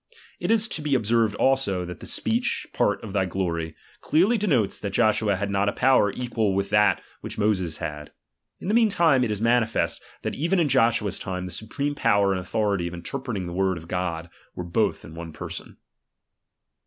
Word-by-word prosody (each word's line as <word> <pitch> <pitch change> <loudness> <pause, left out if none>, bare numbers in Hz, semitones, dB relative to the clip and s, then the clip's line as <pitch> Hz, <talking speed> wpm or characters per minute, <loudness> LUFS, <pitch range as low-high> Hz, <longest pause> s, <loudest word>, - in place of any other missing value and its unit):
It 175 - -3
is 225 0 +3
to 155 - -3
be 150 -2 +1
observed 115 -2 +2
also, 100 -8 +1
that 90 0 -8
that - - -9
speech, 240 +3 +1
part 105 -1 +1
of'' 105 -4 -7
thy 95 -2 +2
glory, 85 -4 -3 0.2
clearly 185 +10 +3
denotes 150 - +1
that 100 -1 -4
Joshua 110 -2 +2
had 100 +2 -3
not 100 +1 +2
a - - -3
power 130 -6 +4
equal 115 -5 -1
with 100 0 -1
that 105 0 +3 0.2
which - - -7
Moses 95 -7 0
had. 75 0 -6 0.5
In - - -7
the 205 - +1
meantime 175 - +4
it 120 - 0
is 105 -1 -2
manifest, 115 -1 +1 0.2
that - - -2
even 170 +5 +1
in 160 -4 +2
Joshua's 115 -5 +2
time 90 -1 -4
the 90 - -6
supreme 140 +9 -3
power 100 -8 +2
and 95 - 0
authority 100 -2 -1
of 85 - -6
interpreting 110 +2 -4
the 85 - -6
word 95 0 +1
of 80 0 -10
God, 85 -2 -3 0.2
were 90 - -4
both 85 -1 0
in 80 - -11
one 80 -1 -8
person. - - -7
105 Hz, 190 wpm, -25 LUFS, 90-130 Hz, 0.5 s, power